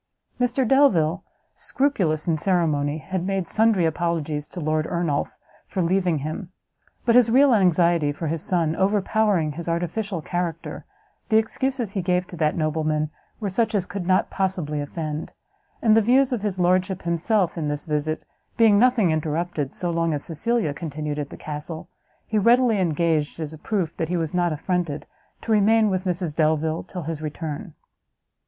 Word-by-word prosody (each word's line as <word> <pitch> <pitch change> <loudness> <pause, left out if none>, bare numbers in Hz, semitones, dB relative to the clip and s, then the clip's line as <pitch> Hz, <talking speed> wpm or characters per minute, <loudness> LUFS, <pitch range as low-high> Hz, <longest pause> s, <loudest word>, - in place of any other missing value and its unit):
Mr 245 +1 +1
Delvile, 195 - +3 0.3
scrupulous 185 - 0
in 165 - +2
ceremony, 155 -4 +1
had 180 +3 -4
made 190 -2 -1
sundry 215 -4 +3
apologies 160 -2 -1
to 180 - -8
Lord 155 0 0
Ernolf 170 -5 -1 0.3
for 185 - -1
leaving 180 -1 +1
him; 170 +4 -5 0.5
but 235 - +4
his 240 -1 +6
real 265 +2 +5
anxiety 170 -6 +3
for 150 +3 -5
his 160 0 -1
son 165 -3 0
overpowering 200 -3 +1
his 170 +3 -5
artificial 175 +3 -2
character, 170 -2 -4 0.4
the 220 - +5
excuses 240 0 -1
he 195 - -2
gave 180 0 +1
to 175 - -9
that 155 0 +1
nobleman 155 -1 0 0.3
were 210 - -2
such 220 +2 0
as 190 -3 +1
could 180 -1 -5
not 185 +1 +2
possibly 180 -6 -1
offend; 155 +1 -5 0.5
and 220 -2 +5
the 225 - +6
views 255 +4 +3
of 235 - -1
his 205 -3 -2
lordship 185 +1 +1
himself 175 +2 +1
in 155 -4 -2
his 145 0 -4
visit, 155 0 -2 0.3
being 220 -3 +5
nothing 235 -7 +4
interrupted, 155 -1 -2
so 175 -1 -2
long 165 -2 0
as 145 - -4
Cecilia 210 0 -1
continued 150 -1 -4
at 145 -1 -4
the - - -10
castle, 155 +3 -6 0.4
he 220 - 0
readily 235 0 +4
engaged, 165 -3 0
as 155 -1 -4
a - - -9
proof 190 -3 -2
that 160 - -2
he 180 - 0
was 160 -1 -2
not 175 -1 +1
affronted, 160 -1 -2 0.4
to 230 - -3
remain 215 0 +4
with 185 0 -1
Mrs 175 -4 -2
Delvile 160 0 +1
till 180 -3 -7
his 160 0 -4
return. 155 +3 -5
175 Hz, 170 wpm, -24 LUFS, 155-205 Hz, 0.5 s, his